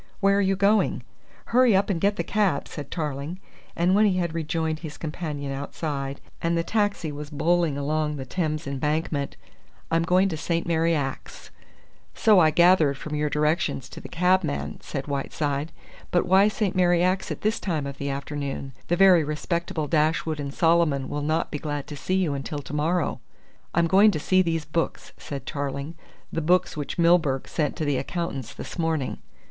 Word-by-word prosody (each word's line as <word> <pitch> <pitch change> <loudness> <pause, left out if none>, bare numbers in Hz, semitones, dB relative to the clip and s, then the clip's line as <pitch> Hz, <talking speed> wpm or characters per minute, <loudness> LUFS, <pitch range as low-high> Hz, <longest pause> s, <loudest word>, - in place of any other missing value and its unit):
"Where 200 0 +3
are - - +3
you 195 0 +2
going?" 200 +2 +2 0.5
"Hurry 250 -4 +5
up 200 +2 +2
and 170 -4 -2
get 200 +1 +2
the - - -2
cab!" 200 -9 0
said 145 -2 -7
Tarling, 150 +1 -4 0.4
and 175 +2 +2
when 210 +2 +5
he 185 -2 +1
had 170 -3 -1
rejoined 160 -1 -2
his 155 -3 -8
companion 150 -3 -4
outside, 140 0 -4 0.2
and 170 0 +1
the 165 - +1
taxi 205 -6 0
was 145 0 -7
bowling 165 0 +1
along 150 +1 -1
the 135 -2 -6
Thames 155 +1 -2
Embankment: 145 +1 -2 0.5
"I'm 165 0 +3
going 180 +3 +3
to 160 - -3
St. 165 +2 -1
Mary 165 0 +2
Axe." 135 -3 -5 0.6
"So 215 -4 +5
I 160 -3 +6
gathered 160 -3 +4
from 150 +2 -7
your 150 0 0
directions 150 -3 0
to - - -10
the - - -10
cabman," 180 -3 0
said 135 -2 -5
Whiteside. 145 +1 -2 0.4
"But 175 - +2
why 190 +3 +5
St. 210 -2 -1
Mary 175 -1 +3
Axe 185 +1 +1
at - - -5
this 215 +2 0
time 160 -7 -2
of 140 0 -7
the 140 - -2
afternoon? 140 -1 -4
The 175 - +2
very 185 -4 +6
respectable 155 +1 -2
Dashwood 155 +1 +1
and 140 -1 -4
Solomon 160 -4 +2
will 145 - -3
not 155 +3 0
be 150 - -3
glad 145 -2 -3
to 150 - -8
see 185 +6 -2
you 180 -6 +1
until 140 +1 -4
to - - -9
morrow." 160 +3 0 0.6
"I'm 170 0 +4
going 195 +6 +6
to 175 - -1
see 185 +5 +3
these 165 -3 -1
books," 165 +1 -2
said 140 -3 -6
Tarling, 140 +2 -4 0.4
"the 165 - -1
books 180 +4 +2
which 150 +3 -4
Milburgh 165 -6 +3
sent 150 -3 -1
to 155 - -2
the 145 -2 +1
accountants 140 -9 -4
this - - -8
morning." 160 -5 -1
160 Hz, 185 wpm, -25 LUFS, 145-180 Hz, 0.6 s, I